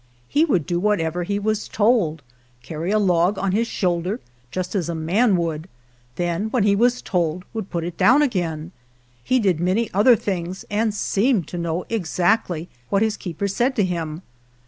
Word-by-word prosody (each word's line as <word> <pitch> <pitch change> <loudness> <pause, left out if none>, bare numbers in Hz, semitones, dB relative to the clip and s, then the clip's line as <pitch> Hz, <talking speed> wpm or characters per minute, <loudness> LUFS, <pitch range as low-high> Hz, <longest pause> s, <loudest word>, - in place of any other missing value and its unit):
He 300 - +3
would 185 - +1
do 175 -1 -1
whatever 180 -4 0
he 200 +2 -1
was 215 +1 -1
told 205 - +1 0.2
— 120 0 -35
carry 160 +6 -4
a 215 - +3
log 185 -1 +2
on 195 0 0
his 225 +4 +1
shoulder, 180 +3 -1 0.3
just 185 +4 -4
as 180 -5 -1
a 170 - -2
man 185 +6 +2
would; 165 0 -3 0.5
then, 175 +6 -1
when 235 -2 +1
he 200 -1 +4
was 245 +4 +2
told, 175 -1 -1
would 220 -4 -4
put 170 -2 -2
it 170 0 -5
down 275 +5 +5
again. 170 - -2 0.5
He 255 - +2
did 190 -9 +2
many 190 +6 0
other 225 +6 +6
things, 185 -3 -4
and 215 +1 +1
seemed 205 - +1
to 175 - -5
know 170 +1 -2
exactly 180 -3 0 0.2
what 200 +1 +2
his 220 -1 0
keeper 180 +2 -4
said 245 +7 0
to 210 - +2
him. 165 -2 -4
185 Hz, 185 wpm, -22 LUFS, 170-215 Hz, 0.5 s, other